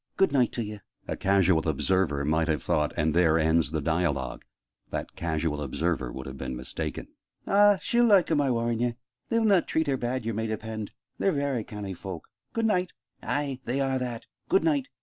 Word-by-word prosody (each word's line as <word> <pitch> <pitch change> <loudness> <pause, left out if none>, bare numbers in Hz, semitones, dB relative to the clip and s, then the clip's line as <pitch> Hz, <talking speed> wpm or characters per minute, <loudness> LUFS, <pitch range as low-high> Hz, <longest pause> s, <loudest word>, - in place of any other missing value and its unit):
Good 195 -4 +4
night 130 -4 +3
t'ye!" 105 -3 -4 0.3
A - - -2
casual 95 -5 +3
observer 80 -2 +1
might 80 +1 +1
have 75 -4 0
thought 75 -1 +1
"and 75 0 +1
there 85 -2 +4
ends 80 0 +3
the 80 - -2
dialogue!" 80 -4 -1 0.5
That - - -5
casual 80 -2 -1
observer 75 -2 -1
would 65 +1 -7
have 65 0 -8
been 65 -1 -4
mistaken. 65 +1 -4 0.4
"Ah, 205 0 +5
she'll 240 0 +3
like 195 -6 +5
'em, 150 -2 +3
I 140 - +1
war'n' 115 -1 0
ye! 120 -1 0 0.3
They'll 230 -1 +2
not 195 -5 +4
treat 160 - +1
her 140 -2 0
bad, 125 -1 -2
yer 115 - -1
may 110 +2 -2
depend. 110 -1 -4 0.3
They're 195 - +3
varry 140 -6 -1
canny 105 -2 -6
fowk. 90 -2 -7 0.2
Good 230 0 -1
night!" 185 -4 +1 0.3
"Ay, 140 -3 -2
they 125 +3 -1
are 135 -1 +1
that! 120 -2 -4 0.2
Good 190 - +4
night!" 145 -5 +1
110 Hz, 190 wpm, -27 LUFS, -, 0.5 s, Ah